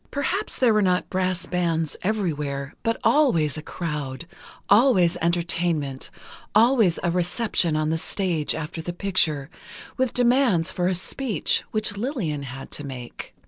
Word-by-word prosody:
Perhaps 370 +9 -1
there 245 -4 +4
were 215 - +3
not 180 -2 +1
brass 185 -2 0
bands 165 -3 -1
everywhere, 150 -9 -2
but 230 -1 0
always 170 - +3
a 155 - -5
crowd, 150 -3 -5 0.4
always 200 -6 +5
entertainment, 170 -5 -1 0.5
always 225 -5 +4
a 175 - +1
reception 180 -1 0
on 155 0 0
the 160 - 0
stage 170 -5 -1
after 160 +1 -5
the 175 +2 -5
picture, 170 -7 +1 0.5
with 260 -2 +1
demands 240 -8 +3
for 180 0 -1
a 185 - +1
speech, 205 - 0
which 215 -2 -1
Lillian 200 - -2
had 135 0 -8
to 145 - -5
make. 130 -4 -8
175 Hz, 140 wpm, -24 LUFS, 155-215 Hz, 0.5 s, always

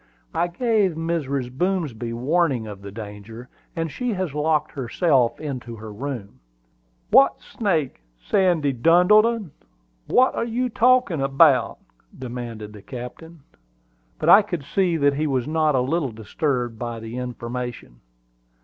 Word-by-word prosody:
"I 175 - +1
gave 210 0 +1
Mrs. 140 -6 -3
Boomsby 150 - -1
warning 135 0 0
of 105 -2 -9
the 100 0 -9
danger, 110 +3 -9 0.3
and 165 -2 -2
she 245 - -2
has 185 -6 -3
locked 150 0 0
herself 130 -1 +1
into 130 -6 -6
her 110 -1 -9
room." 115 - -6 0.7
"What 270 +4 +5
snake, 165 - -2 0.2
Sandy 155 - +1
Duddleton? 180 - +4 0.6
What 250 -2 +2
you 250 +2 -1
talking 245 - +3
about?" 135 0 +4 0.4
demanded 120 -4 -7
the 105 - -11
captain. 140 +8 -9 0.8
But - - 0
I 205 - +9
could 175 -7 -5
see 175 +3 0
that 145 -2 +3
he 155 +2 -1
was 130 -3 -1
not 155 -2 +1
a 130 - +3
little 140 +1 -1
disturbed 120 - -2
by 120 -1 -4
the 115 +2 -7
information. 120 - -6
140 Hz, 130 wpm, -23 LUFS, 120-175 Hz, 0.8 s, I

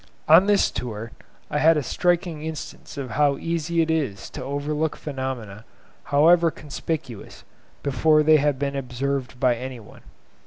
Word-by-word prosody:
On 165 +6 +7
this 205 -1 +3
tour 115 -2 -5 0.4
I 150 - 0
had 160 +1 +5
a 150 - 0
striking 175 0 0
instance 160 -2 -7
of 130 -4 -5
how 145 +3 +2
easy 165 +1 0
it 160 - -1
is 140 -12 -2
to 130 - -7
overlook 145 +3 -2
phenomena, 130 -7 -5 0.4
however 165 +4 +5
conspicuous, 145 -6 -6 0.4
before 150 +3 +3
they 155 0 +6
have 145 -2 +1
been 140 0 -2
observed 130 0 -3
by 125 -2 +3
any 125 +1 -7
one. 105 - -15
145 Hz, 150 wpm, -24 LUFS, 130-160 Hz, 0.4 s, On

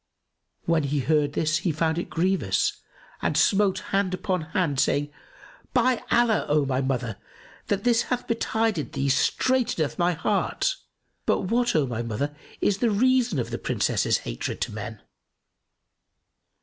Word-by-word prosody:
When 165 -1 +2
he 145 0 -1
heard 150 0 +1
this, 155 0 +1
he 175 +1 0
found 160 +2 0
it - - -5
grievous 185 +3 +1 0.4
and - - 0
smote 195 -2 +3 0.2
hand 195 -2 +1
upon 185 -2 -1
hand, 155 -3 -1
saying, 145 +1 +1 0.6
"By 250 0 +3
Allah, 235 -3 +3
O 150 -1 +3
my 130 -1 0
mother, 125 -5 -2 0.5
this 230 +4 +2
that - - -6
hath 250 -1 -2
betided 225 -6 -1
thee 140 0 0
straiteneth 180 - +1
my 175 +1 +3
heart! 205 - 0 0.5
But, - - +2
what, 240 -2 +2
O 155 -3 +3
my 120 -3 -3
mother, 120 +6 -3 0.3
is 200 -1 +2
the 235 - +2
reason 245 - +2
of 120 - -2
the - - -3
Princess's - - +1
hatred - - -4
to - - -1
men?" - - -7
175 Hz, 150 wpm, -25 LUFS, 145-220 Hz, 0.6 s, smote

